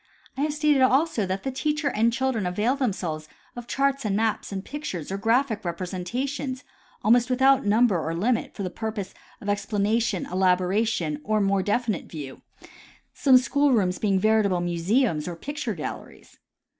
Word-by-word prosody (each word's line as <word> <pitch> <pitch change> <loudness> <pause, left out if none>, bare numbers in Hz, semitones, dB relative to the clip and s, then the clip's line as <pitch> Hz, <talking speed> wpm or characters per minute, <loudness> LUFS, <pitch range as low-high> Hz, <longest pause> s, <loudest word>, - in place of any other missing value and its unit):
I 265 - -3
have 300 0 0
stated 300 -2 +3
also 260 - +2
that 190 +1 -3
the 270 - -2
teacher 300 +3 -1
and 230 +2 +2
children 250 -5 -1
avail 210 +8 +1
themselves 175 - -3 0.3
of 240 -1 -8
charts 275 +1 0
and 205 -3 0
maps 220 0 -1
and 195 0 -5
pictures 195 - -5
or 195 - -2
graphic 230 +1 +1
representations 235 +10 -4 0.4
almost 240 +3 +4
with 255 0 0
out 270 -3 +4
number 210 -5 +3
or 165 +1 -2
limit 225 +7 0
for 200 - -4
the 185 - -3
purpose 215 0 -5 0.3
of 205 - -10
explanation, 205 0 0
elaboration 185 -3 +1
or 215 +3 +1
more 195 -1 +2
definite 210 0 -1
view, 140 -5 -8 0.7
some 265 -3 +5
school 280 +2 +2
rooms 185 -5 +1
being 200 -3 +2
veritable 215 -3 +2
mu 175 -1 -2
seums 190 - +1
or 175 - -4
picture 275 - -4
galleries. 155 - -8
215 Hz, 165 wpm, -25 LUFS, 185-260 Hz, 0.7 s, some